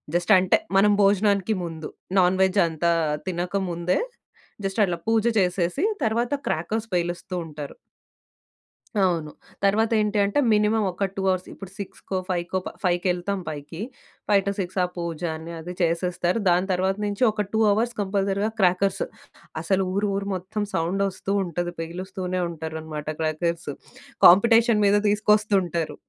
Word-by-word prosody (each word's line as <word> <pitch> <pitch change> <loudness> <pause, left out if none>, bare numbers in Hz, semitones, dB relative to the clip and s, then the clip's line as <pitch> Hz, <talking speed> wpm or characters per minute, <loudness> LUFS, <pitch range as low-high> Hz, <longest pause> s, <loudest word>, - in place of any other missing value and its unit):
జస్టంటే, 185 +1 +4 0.2
మనం 205 +2 +5
భోజనానికి 200 +1 +3
ముందు, 160 -2 -6 0.3
నాన్ 180 0 +3
వెజ్ 190 +1 +2
అంతా 165 +1 0 0.4
తినక 175 0 -3 0.2
ముందే, 175 +1 0 0.7
జస్టట్లా 195 -3 +1
పూజ 225 -1 +3 0.2
చేసేసి, 180 - 0 0.2
తరవాత 235 +4 0
క్రాకర్స్ 215 +8 -2
పేలుస్తూ 175 +1 -2
ఉంటారు. 150 -2 -8 1.3
అవును. 165 -5 0 0.3
తర్వాతేంటి 215 +1 +2
అంటే, 205 +8 +1
మినిమం 210 +1 +2
ఒక 190 +3 -1
2 195 - -3
అవర్స్ 185 -1 -1
ఇప్పుడు 195 -2 -10
సిక్స్‌కో, 195 -1 -5
ఫైవ్‌కో 175 +1 -1
ప - - -2
ఫైవ్‌కెళ్తాం 180 +2 0
పైకి. 150 +3 -7 0.5
5 200 -2 +4
టూ - - +2
6 185 0 -4
అ - - +3
పూజ 170 -2 -4
అని, 160 +1 -8
అదీ 175 +3 -7
చేసేస్తారు. 175 +3 0
దాని 180 +2 +2
తర్వాత 190 +1 +1
నుంచి 205 +3 -1
ఒక 210 -1 -2
2 220 - +2
అవర్స్ 230 +4 +1
కంపల్సరీగా 200 +1 0
క్రాకర్స్ 185 +1 +2 0.6
అసలు 190 +3 +1
ఊరు 205 +1 +1
ఊరు 200 0 -3
మొత్తం 195 +4 -4
సౌండొస్తూ 190 +3 -1
ఉంటది. 175 0 -3
పెలుస్తూనే 185 +2 -4
ఉంటారనమాట 160 -2 -6
క్రాకర్స్. 165 +2 -1 0.6
కాంపిటేషన్ 225 +4 +5
మీద 200 0 +4
తీసుకొస్తుంటారు. 205 -5 +1
185 Hz, 130 wpm, -24 LUFS, 175-205 Hz, 1.3 s, మనం